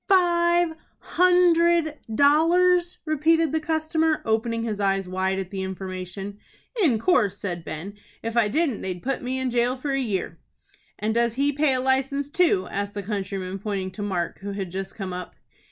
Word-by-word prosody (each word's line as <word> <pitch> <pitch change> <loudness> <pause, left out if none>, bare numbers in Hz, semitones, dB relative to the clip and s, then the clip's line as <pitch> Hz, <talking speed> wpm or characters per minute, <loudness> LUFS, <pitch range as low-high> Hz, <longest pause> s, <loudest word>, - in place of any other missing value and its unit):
"Five 345 -2 +3 0.2
hundred 340 -3 +3 0.2
dollars!" 345 +6 +4
repeated 315 0 +2
the 320 - +1
customer, 315 0 0
opening 225 +1 0
his 215 -3 -3
eyes 195 -1 +1
wide 190 +1 -1
at 190 -1 -4
the 195 -1 -4
information. 190 +1 -6 0.4
"In 280 - +4
course," 215 - +2
said 175 -5 -4
Ben. 175 +7 -6 0.3
"If 230 +1 -3
I 235 -3 +4
didn't 280 0 0
they'd 180 -2 -5
put 270 0 -2
me 255 +1 -3
in 260 -1 -1
jail 245 +2 +1
for 275 +2 -3
a 270 - +1
year." 195 -9 -3 0.6
"And 215 +1 -1
does 235 0 +1
he 280 +2 +2
pay 290 -1 +2
a 255 - 0
license 270 +2 0
too?" 330 - +2
asked 200 +1 -3
the 205 - -4
countryman, 195 -2 -4
pointing 195 -2 -3
to 205 - -8
Mark, 185 -4 -2
who 200 +1 -5
had 195 -3 -4
just 190 +1 -5
come 190 -3 -5
up. 180 0 -7
235 Hz, 175 wpm, -24 LUFS, 195-315 Hz, 0.6 s, dollars